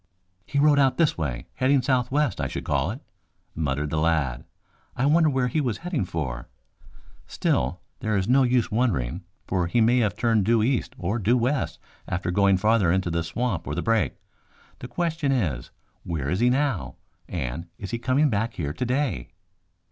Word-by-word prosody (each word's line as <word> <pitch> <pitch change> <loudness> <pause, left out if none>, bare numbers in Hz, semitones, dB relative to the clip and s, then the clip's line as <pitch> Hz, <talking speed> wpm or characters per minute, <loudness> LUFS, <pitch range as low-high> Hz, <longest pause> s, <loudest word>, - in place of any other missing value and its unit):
"He 145 - -3
rode 145 0 +5
out 135 -2 +3
this 165 -3 +3
way, 65 -7 -3
heading 130 0 +2
southwest, 130 +1 +1
I - - 0
should - - -5
call 70 +2 0
it," 120 +8 -6 0.5
muttered 75 -1 -2
the 80 - 0
lad. 75 -6 0 0.5
"I 130 - 0
wonder 155 +2 +4
where 130 -3 +1
he 150 +5 0
was 120 -6 -1
heading 170 - -1
for? 65 -8 -4 0.8
Still, - - 0 0.2
there 110 -1 0
is 95 0 0
no 130 +3 +5
use 125 -2 +2
wondering, 95 - 0 0.2
for 90 -3 0
he 120 - +1
may 120 +3 +4
have 105 -4 +1
turned 115 -3 +2
due 115 +1 +3
east 125 +2 0
or 100 +7 -2
due 115 +5 +3
west 130 +4 0 0.3
after 90 -1 -2
going 100 +1 +4
farther 105 -3 +3
into 95 -1 0
the 85 0 0
swamp 85 +1 -2
or 75 - -2
the 85 - -2
brake. 115 -2 +1 0.6
The 125 - -7
question 160 -2 -1
is, 85 - -1 0.3
where 75 -5 -3
is 90 - 0
he 120 - +4
now, 135 -6 0 0.3
and 80 +1 -4
is 100 - -7
he 120 - -2
coming 130 +4 +2
back 110 +2 -1
here 75 -3 -3
today?" 125 - -1
110 Hz, 180 wpm, -25 LUFS, 85-130 Hz, 0.8 s, rode